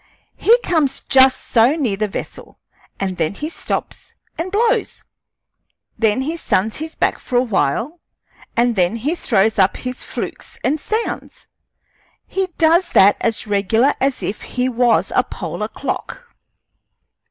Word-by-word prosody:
He 465 Hz, +3 st, +5 dB
comes 310 Hz, -6 st, 0 dB
just 265 Hz, -1 st, +5 dB
so 240 Hz, +5 st, +3 dB
near 255 Hz, -11 st, 0 dB
the 215 Hz, +2 st, -1 dB
vessel, 200 Hz, -, -8 dB, 0.4 s
and 190 Hz, -2 st, -2 dB
then 165 Hz, +4 st, -1 dB
he 305 Hz, +7 st, -5 dB
stops -, -, -5 dB, 0.2 s
and 335 Hz, +3 st, -4 dB
blows. 450 Hz, +2 st, 0 dB, 0.9 s
Then 220 Hz, +2 st, +1 dB
he 320 Hz, +5 st, -3 dB
suns 215 Hz, -, 0 dB
his 315 Hz, +1 st, -6 dB
back -, -, 0 dB
for 250 Hz, -, -6 dB
a 245 Hz, -, +4 dB
while, 235 Hz, -, -1 dB, 0.6 s
and 240 Hz, 0 st, +3 dB
then 180 Hz, +2 st, +2 dB
he 265 Hz, +8 st, -1 dB
throws 215 Hz, -, +1 dB
up 190 Hz, 0 st, +3 dB
his 250 Hz, 0 st, -6 dB
flukes -, -, -6 dB
and 295 Hz, +4 st, +1 dB
sounds. 440 Hz, +8 st, -4 dB, 0.8 s
He 385 Hz, -1 st, -2 dB
does 335 Hz, +2 st, +4 dB
that 200 Hz, +2 st, +6 dB
as 225 Hz, -1 st, -1 dB
regular 220 Hz, +6 st, +2 dB
as 270 Hz, -1 st, 0 dB
if 205 Hz, -, -3 dB
he 250 Hz, 0 st, -2 dB
was 245 Hz, -2 st, +2 dB
a -, -, +4 dB
polar -, -, -5 dB
clock. -, -, -6 dB
250 Hz, 145 wpm, -19 LUFS, 215-315 Hz, 0.9 s, that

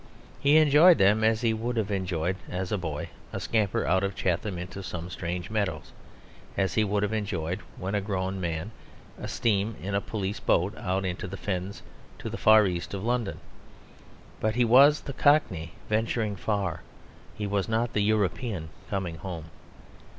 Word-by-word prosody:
He 145 Hz, +2 st, +5 dB
enjoyed 155 Hz, +3 st, +7 dB
them 105 Hz, +3 st, +4 dB
as 110 Hz, 0 st, +3 dB
he 115 Hz, -2 st, +2 dB
would 115 Hz, +2 st, -2 dB
have 105 Hz, -2 st, 0 dB
enjoyed, 90 Hz, -2 st, -1 dB
as 90 Hz, 0 st, -3 dB
a 105 Hz, -, +1 dB
boy, 80 Hz, -4 st, -4 dB, 0.2 s
a -, -, -4 dB
scamper 105 Hz, -4 st, 0 dB
out 95 Hz, +2 st, +2 dB
of 100 Hz, 0 st, -1 dB
Chatham 95 Hz, +1 st, -1 dB
into 90 Hz, +3 st, -6 dB
some 90 Hz, -2 st, -6 dB
strange 85 Hz, +2 st, -4 dB
meadows, 100 Hz, -8 st, -2 dB, 0.7 s
as 95 Hz, -3 st, +1 dB
he 110 Hz, -, +3 dB
would 105 Hz, 0 st, 0 dB
have 105 Hz, +1 st, -1 dB
enjoyed, 95 Hz, -4 st, -2 dB, 0.2 s
when 95 Hz, +2 st, -4 dB
a 105 Hz, -, +1 dB
grown 95 Hz, -1 st, -2 dB
man, 85 Hz, +3 st, -3 dB, 0.5 s
a -, -, -5 dB
steam 110 Hz, -1 st, 0 dB
in 100 Hz, +2 st, -4 dB
a 100 Hz, -, +1 dB
police 100 Hz, -2 st, -3 dB
boat 95 Hz, +5 st, +1 dB
out 95 Hz, -1 st, -1 dB
into 90 Hz, 0 st, -3 dB
the 95 Hz, +1 st, -6 dB
fens 95 Hz, 0 st, -4 dB, 0.3 s
to -, -, -6 dB
the -, -, -4 dB
far 110 Hz, 0 st, +7 dB
east 90 Hz, +1 st, -3 dB
of 95 Hz, -, -5 dB
London. 120 Hz, -3 st, -1 dB, 1.0 s
But 110 Hz, 0 st, 0 dB
he 125 Hz, -1 st, +3 dB
was 140 Hz, +6 st, +7 dB
the 140 Hz, -, -6 dB
Cockney 95 Hz, -, +2 dB
venturing 110 Hz, -1 st, 0 dB
far; 100 Hz, -3 st, -2 dB, 0.5 s
he 105 Hz, -, -3 dB
was 100 Hz, -1 st, -1 dB
not 115 Hz, +1 st, 0 dB
the 105 Hz, -, +1 dB
European 100 Hz, -3 st, 0 dB, 0.2 s
coming 95 Hz, -6 st, -2 dB
home. 80 Hz, -2 st, -7 dB
100 Hz, 175 wpm, -27 LUFS, 90-110 Hz, 1.0 s, enjoyed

